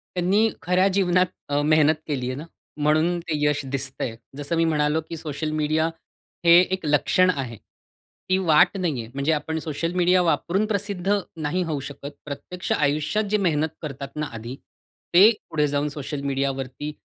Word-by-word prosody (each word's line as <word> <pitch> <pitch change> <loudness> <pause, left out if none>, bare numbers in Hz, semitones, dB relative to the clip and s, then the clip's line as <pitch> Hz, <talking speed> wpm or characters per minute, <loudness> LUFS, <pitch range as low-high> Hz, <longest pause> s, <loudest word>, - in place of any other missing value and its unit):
त्यांनी 195 +5 +3
खऱ्या 180 +4 +3
जीवनात 185 -2 +3 0.2
अ, 145 0 +1
मेहनत 155 0 +4
केली 130 -4 -2
आहे 130 - -3
ना 155 - -7 0.3
म्हणून 155 +4 +2
ते 165 -2 -4
यश 150 0 +1
दिसतं 135 -1 -3
आहे. 115 - -3 0.2
जसं 145 +3 -2
मी 165 - +3
म्हणालो, 150 0 +1
की 165 - -5
सोशल 155 0 -4
मीडिया 155 +1 +1 0.6
हे 170 +1 +9
एक 190 -4 -2
लक्षण 150 +5 +3
आहे. 130 - -2 0.7
ती 185 - +4
वाट 170 +1 +4
नाही 160 -10 -1
आहे 115 - -10
म्हणजे 140 +3 0
आपण 160 +1 -1
सोशल 160 +2 -3
मीडिया 180 0 +4
वापरून 180 +4 +1
प्रसिद्ध 200 -1 0 0.2
नाही 160 +5 -1
होऊ 155 -4 -2
शकत. 145 0 -8
प्रत्यक्ष 170 +5 -6
आयुष्यात 150 +8 +1
जे 210 - +4
मेहनत 160 -4 0
करतात 140 -2 -6
ना 150 0 -2
आधी 115 +3 -6 0.6
ते 190 +5 +9 0.2
पुढे 150 -1 +1
जाऊन 145 +1 0
सोशल 145 0 -5
मीडियावरती 135 +1 -2
155 Hz, 170 wpm, -24 LUFS, 145-180 Hz, 0.7 s, हे